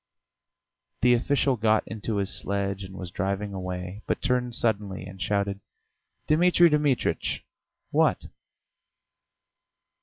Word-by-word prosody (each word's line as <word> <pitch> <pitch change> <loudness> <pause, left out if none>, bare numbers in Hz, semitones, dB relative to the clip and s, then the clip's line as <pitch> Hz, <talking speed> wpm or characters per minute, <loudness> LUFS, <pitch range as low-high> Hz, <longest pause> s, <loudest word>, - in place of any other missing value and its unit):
The 125 0 +6
official 135 +1 +2
got 110 0 +2
into 110 0 -4
his 100 -1 0
sledge 100 0 -2
and 95 0 -9
was 90 -2 -6
driving 100 +2 -2
away, 90 +1 -5
but - - 0
turned 125 -2 0
suddenly 100 -5 0
and 95 0 -10
shouted: 100 -1 0 0.7
"Dmitri 175 +2 +5
Dmitritch!" 150 -4 0 0.5
"What?" - - +2
105 Hz, 110 wpm, -26 LUFS, 95-125 Hz, 0.7 s, The